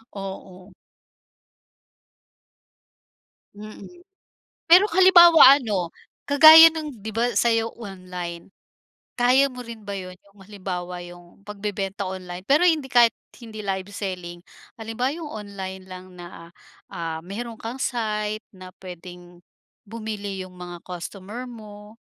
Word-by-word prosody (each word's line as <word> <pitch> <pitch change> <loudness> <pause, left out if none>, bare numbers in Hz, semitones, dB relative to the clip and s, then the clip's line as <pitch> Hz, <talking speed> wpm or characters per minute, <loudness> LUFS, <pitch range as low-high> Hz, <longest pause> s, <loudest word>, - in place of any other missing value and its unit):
Oo. 190 -1 -9 2.8
Mm, 210 -1 -11 0.8
pero 370 +5 +6
kung 335 - -4
halimbawa 345 -7 +8
ano, 195 -8 -3 0.3
kagaya 315 +3 +9
ng 300 -9 -7
'di 220 - -4
ba 235 +2 0
sa'yo 230 -1 +1
online, 180 -5 -8 0.7
kaya 255 +3 +4
mo 250 -1 -9
rin 230 -1 -10
ba 200 - -5
yun, 185 -1 -8
yung 200 0 -24
halimbawa 180 -3 -6
yung 175 +1 -15
pagbebenta 200 -1 -5
online? 185 -1 -7
Pero 300 +6 +4
hindi 310 -5 +1
kahit 235 -2 +5 0.3
hindi 220 -2 -9
live 190 0 -3
selling. 180 -4 -6 0.4
Halimbawa 225 +4 -3
yung 330 -3 -8
online 195 -3 -8
lang 185 0 -11
na, 175 -1 -12 0.4
ah, 165 -1 -5
meron 225 +4 -7
kang 235 +3 -6
site 215 -3 -2
na 185 0 -12
puwedeng 180 -1 -12 0.5
bumili 205 -3 -6
yung 180 - -16
mga 175 -1 -9
costumer 195 +6 -8
mo? 210 -2 -13
205 Hz, 120 wpm, -23 LUFS, 185-235 Hz, 2.8 s, kagaya